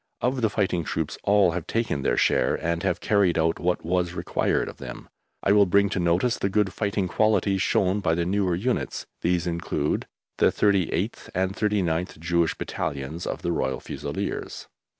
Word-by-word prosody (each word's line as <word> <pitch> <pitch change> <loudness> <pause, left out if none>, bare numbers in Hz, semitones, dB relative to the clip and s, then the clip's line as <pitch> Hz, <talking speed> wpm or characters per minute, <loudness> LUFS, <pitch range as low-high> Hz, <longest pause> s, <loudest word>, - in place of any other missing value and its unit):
Of 125 +1 0
the 110 - +3
fighting 95 -5 0
troops, 75 - -3
all 100 -3 +4
have 85 -1 -4
taken 115 -11 -1
their - - +1
share - - +3
and 85 0 -2
have - - -1
carried 100 -5 +2
out 80 0 +1
what 90 -1 -1
was 90 0 0
required - - 0
of - - -8
them. - - -9 0.3
I 100 - +3
will 100 -1 +5
bring 100 +2 +3
to 95 - -2
notice 90 +8 +1
the 100 - 0
good 95 -1 +1
fighting 100 -2 -1
qualities 100 -1 +2
shown 95 0 +2
by 80 -5 +1
the 85 0 0
newer 95 -1 +1
units. 120 +8 -2 0.2
These 85 0 +1
include... 85 -4 -1 0.3
the - - +5
38th 100 -4 0
and 95 +1 0
39th 90 -7 0
(Jewish) 85 +1 +1
Battalions 70 +5 -4
of - - -4
the 85 - 0
Royal 65 -5 -1
Fusiliers. - - -5
90 Hz, 175 wpm, -25 LUFS, 85-100 Hz, 0.3 s, will